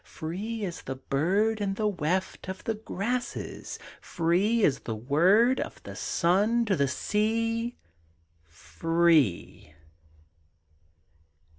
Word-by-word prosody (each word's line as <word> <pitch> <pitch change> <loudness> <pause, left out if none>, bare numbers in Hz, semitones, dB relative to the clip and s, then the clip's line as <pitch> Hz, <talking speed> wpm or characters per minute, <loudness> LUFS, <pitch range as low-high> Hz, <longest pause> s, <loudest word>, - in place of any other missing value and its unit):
Free 205 +7 -5
as 175 -3 -6
the 135 - -5
bird 195 +12 0
In 195 -1 -1
the 215 - -1
weft 185 0 -2
of 190 0 -6
the 225 - -1
grasses! 220 +3 -4 0.2
Free 190 +7 +2
as 135 - +2
the 110 - -5
word 180 - +3
Of - - -6
the - - -8
sun 205 +7 +2
to 205 -3 +1
the 140 -4 +2
sea 225 - -1 0.7
Free! 90 - 0
190 Hz, 110 wpm, -28 LUFS, 155-220 Hz, 0.7 s, word